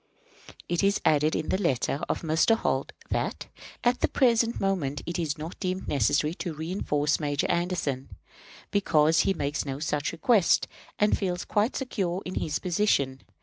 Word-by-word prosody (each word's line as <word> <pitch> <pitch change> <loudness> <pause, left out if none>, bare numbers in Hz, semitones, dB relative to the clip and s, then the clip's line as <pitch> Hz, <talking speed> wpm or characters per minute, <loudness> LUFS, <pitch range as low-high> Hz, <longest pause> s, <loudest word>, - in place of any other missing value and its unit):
It 175 +2 0
is 200 +1 +3
added 155 +1 +3
in 155 - -2
the 190 - 0
letter 140 -3 0
of - - -2
Mr. 160 +8 +3
Holt - - -1 0.2
that - - -2 0.4
"at 245 +1 +2
the - - +2
present 235 -3 +2
moment 170 -8 -1
it 170 +1 -3
is 160 -3 -1
not 160 +3 -7
deemed 185 -1 -3
necessary 145 +4 +2
to 170 -4 -4
reënforce 155 -2 -1
Major 145 -2 -1
Anderson, 170 -7 -1 0.6
because 160 -5 +3
he 195 - +2
makes 145 -1 -2
no 135 -2 -4
such 150 -1 -1
request, 205 -1 +3 0.3
and 210 0 +3
feels 180 -3 -2
quite 210 +5 +1
secure 195 -8 -2
in 180 - -5
his 150 -4 -1
position. 165 -8 +1
170 Hz, 160 wpm, -27 LUFS, 150-195 Hz, 0.6 s, is